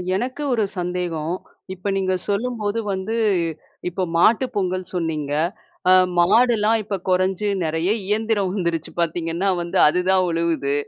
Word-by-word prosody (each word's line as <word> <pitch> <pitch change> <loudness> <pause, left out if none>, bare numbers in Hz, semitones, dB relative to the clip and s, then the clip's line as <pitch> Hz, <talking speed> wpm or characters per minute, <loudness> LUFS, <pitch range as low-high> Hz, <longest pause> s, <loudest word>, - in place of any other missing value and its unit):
எனக்கு 255 +8 -3
ஒரு 225 -3 +2 0.2
சந்தேகம். 175 -2 -2 0.4
இப்ப 190 +2 -7
நீங்க 190 -1 0 0.2
சொல்லும்போது 215 0 -1
வந்து, 190 +4 -3 0.7
இப்ப 185 +2 -3
மாட்டு 220 +9 +4
பொங்கல் 185 -2 -2
சொன்னீங்க. 155 -4 -2 0.6
அ - - +7 0.3
மாடுலாம் 220 +3 +4
இப்ப 205 0 -3
குறைஞ்சு, 185 +2 +1 0.2
நெறைய 165 +3 0 0.2
இயந்திரம் 210 -2 +1
வந்துருச்சு 170 -4 -2
பார்த்தீங்கன்னா 170 +3 -1
வந்து, 170 0 -2
அதுதான் 180 +3 +3
உழுவுது. 165 -4 0
185 Hz, 120 wpm, -22 LUFS, 170-210 Hz, 0.7 s, அ